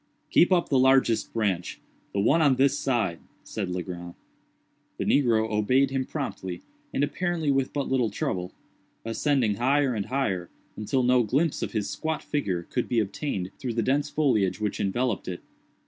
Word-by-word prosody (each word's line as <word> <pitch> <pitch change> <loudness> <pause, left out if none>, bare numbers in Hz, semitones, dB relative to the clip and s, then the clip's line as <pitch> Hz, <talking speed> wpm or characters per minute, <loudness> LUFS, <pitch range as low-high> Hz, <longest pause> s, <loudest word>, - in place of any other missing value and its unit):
"Keep 175 - +5
up 175 -2 +3
the 135 - +3
largest 130 -3 +3
branch—the 100 -2 -3
one 140 +11 +3
on 140 -4 +5
this 140 +2 +2
side," 110 -11 0 0.2
said 100 -4 -4
Legrand. 90 -1 -5 0.8
The - - -2
negro 115 -5 +3
obeyed 130 +6 +2
him 135 -1 -1
promptly, 95 - -5 0.3
and 140 - 0
apparently 165 0 0
with 135 -1 +1
but 140 -2 -2
little 125 -4 +1
trouble; 90 -3 -3 0.5
ascending 115 -2 +1
higher 135 +2 +2
and 105 -3 -3
higher, 95 -10 -1 0.3
until 115 +5 0
no 125 0 +4
glimpse 140 +8 0
of - - -3
his 105 -3 -1
squat 160 0 -3
figure 95 - -2
could 125 +7 -3
be 120 - +2
obtained 100 -2 -3
through 120 -4 -3
the 115 - +1
dense 140 +4 +1
foliage 115 -12 +1
which 105 -2 -2
enveloped 110 +2 -1
it. 90 -1 -5
125 Hz, 165 wpm, -26 LUFS, 100-140 Hz, 0.8 s, Keep